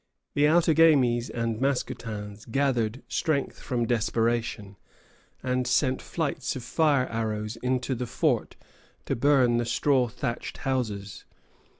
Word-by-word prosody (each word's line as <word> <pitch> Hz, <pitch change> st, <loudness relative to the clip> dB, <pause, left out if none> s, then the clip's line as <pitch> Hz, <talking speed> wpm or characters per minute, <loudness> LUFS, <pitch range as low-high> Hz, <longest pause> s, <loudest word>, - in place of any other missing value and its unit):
The 145 Hz, +1 st, +4 dB
Outagamies 155 Hz, -7 st, +4 dB
and 115 Hz, -1 st, -2 dB
Mascoutins 110 Hz, -6 st, -3 dB
gathered 125 Hz, -2 st, 0 dB
strength 150 Hz, -4 st, -1 dB
from 120 Hz, -2 st, -1 dB
desperation, 115 Hz, -2 st, -1 dB, 0.7 s
and 125 Hz, -1 st, 0 dB
sent 130 Hz, 0 st, +2 dB
flights 155 Hz, -4 st, -3 dB
of 130 Hz, -, -6 dB
fire 145 Hz, 0 st, +2 dB
arrows 110 Hz, -2 st, -3 dB
into 125 Hz, +2 st, -1 dB
the 125 Hz, 0 st, -3 dB
fort -, -, 0 dB, 0.5 s
to -, -, -1 dB
burn 125 Hz, -2 st, +3 dB
the 120 Hz, -, 0 dB
straw 130 Hz, +1 st, +2 dB
thatched 115 Hz, +1 st, -4 dB
houses. 105 Hz, -7 st, -3 dB
125 Hz, 115 wpm, -27 LUFS, 115-135 Hz, 0.7 s, The